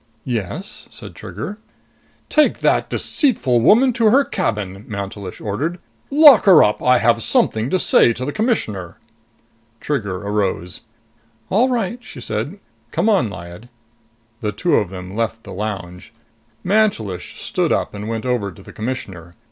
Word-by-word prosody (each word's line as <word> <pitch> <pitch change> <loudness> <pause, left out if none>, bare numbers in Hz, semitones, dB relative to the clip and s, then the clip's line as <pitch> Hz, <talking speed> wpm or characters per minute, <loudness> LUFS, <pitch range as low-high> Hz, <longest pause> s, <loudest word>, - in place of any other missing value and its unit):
"Yes?" 115 -8 -4
said - - -10
Trigger. 110 - -7 0.7
"Take 305 -1 +2
that - - +2
deceitful 145 - +1
woman 245 - +5
to 225 -2 +3
her 270 +6 +5
cabin," 100 -2 -3
Mantelish 100 -3 -6
ordered. 135 - -3 0.3
"Lock 290 -3 +7
her 185 -6 +8
up. 105 - +1
I 125 0 +4
have 115 0 +2
something 110 +2 +1
to 185 - +2
say 120 - +4
to 125 +2 -5
the 145 - -2
Commissioner." 110 - -2 0.8
Trigger 105 -10 -2
arose. 95 -3 -2 0.7
"All 235 +7 +3
right," 240 -1 -2
she - - -10
said. - - -4 0.3
"Come 225 - 0
on, 190 - +2
Lyad." 90 +4 -10 0.7
The 105 -4 -2
two 155 - -1
of 100 - 0
them 95 +1 -8
left 115 0 -2
the - - -9
lounge. 100 -2 -6 0.5
Mantelish 180 - 0
stood - - -1
up - - 0
and 105 +1 -6
went 115 +1 -3
over 120 -6 -1
to 95 - -15
the - - -13
Commissioner. 95 -8 -6
115 Hz, 150 wpm, -19 LUFS, -, 0.8 s, her